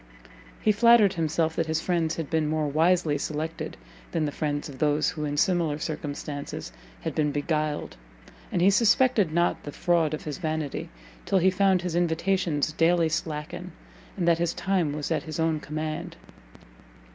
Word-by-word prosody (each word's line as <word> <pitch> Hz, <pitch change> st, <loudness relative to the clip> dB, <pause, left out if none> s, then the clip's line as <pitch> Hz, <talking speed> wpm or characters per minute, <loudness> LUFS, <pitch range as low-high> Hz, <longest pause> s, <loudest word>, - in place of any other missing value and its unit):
he 215 Hz, -, +3 dB
flattered 215 Hz, -2 st, +5 dB
himself 160 Hz, 0 st, 0 dB
that 165 Hz, -, 0 dB
his 160 Hz, 0 st, 0 dB
friends 165 Hz, -2 st, 0 dB
had 165 Hz, -3 st, -4 dB
been 160 Hz, -1 st, 0 dB
more 155 Hz, -1 st, 0 dB
wisely 160 Hz, 0 st, +2 dB
selected 155 Hz, +2 st, -4 dB, 0.4 s
than 160 Hz, -2 st, +1 dB
the 145 Hz, -, -2 dB
friends 145 Hz, -1 st, -2 dB
of 135 Hz, -2 st, -10 dB
those 150 Hz, 0 st, +2 dB
who 155 Hz, -3 st, -4 dB
in 145 Hz, 0 st, -3 dB
similar 165 Hz, -3 st, +2 dB
circumstances 145 Hz, -, -5 dB, 0.3 s
had -, -, -3 dB
been 150 Hz, -1 st, +1 dB
beguiled, 150 Hz, -, -2 dB, 0.6 s
and 175 Hz, -, +1 dB
he 195 Hz, -, +6 dB
suspected 225 Hz, -3 st, +3 dB
not 170 Hz, +2 st, +1 dB
the 145 Hz, -, -7 dB
fraud 165 Hz, -1 st, +1 dB
of -, -, -10 dB
his 150 Hz, +1 st, -5 dB
vanity, 155 Hz, -4 st, -3 dB, 0.3 s
till 195 Hz, -, +1 dB
he 190 Hz, +1 st, +4 dB
found 190 Hz, -1 st, +2 dB
his 180 Hz, -2 st, -2 dB
invitations 170 Hz, -2 st, +1 dB
daily 165 Hz, +1 st, +3 dB
slacken, 160 Hz, +3 st, -4 dB, 0.4 s
and 175 Hz, -3 st, 0 dB
that 170 Hz, -1 st, +4 dB
his 170 Hz, -1 st, 0 dB
time 185 Hz, -6 st, 0 dB
was 150 Hz, +2 st, -4 dB
at 160 Hz, -, +1 dB
his 155 Hz, -1 st, -6 dB
own 160 Hz, -1 st, +1 dB
command. 155 Hz, +1 st, -4 dB
160 Hz, 170 wpm, -26 LUFS, 150-175 Hz, 0.6 s, he